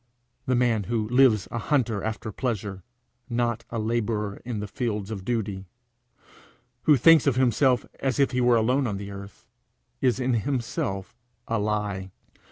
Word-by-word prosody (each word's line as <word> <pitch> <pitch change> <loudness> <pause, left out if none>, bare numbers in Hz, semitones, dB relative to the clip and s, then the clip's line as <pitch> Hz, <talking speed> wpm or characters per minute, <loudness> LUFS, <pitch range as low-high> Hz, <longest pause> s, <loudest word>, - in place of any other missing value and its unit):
The 130 - +2
man 120 -4 +2
who 110 -1 -1
lives 125 -5 +4
a 115 - -2
hunter 115 -7 0
after 110 0 -4
pleasure, 105 -5 -3 0.5
not 120 -1 -1
a 115 - -4
labourer 110 -2 -1
in 120 -3 -4
the 105 - -3
fields 105 -1 -3
of 100 -4 -5
duty, 100 -4 -2 1.2
who 150 -2 +6
thinks 160 +3 +6
of 135 - +3
himself 130 0 +3
as 135 -3 -1
if 140 - +3
he 125 -1 0
were 120 -1 +5
alone 125 +4 +2
on 100 -3 -2
the 100 0 -7
earth, 100 0 -10 0.6
is 125 -1 +2
in 130 0 +1
himself 115 -4 -2 0.3
a 115 -1 0
lie. 105 -2 -2
115 Hz, 160 wpm, -26 LUFS, 105-125 Hz, 1.2 s, who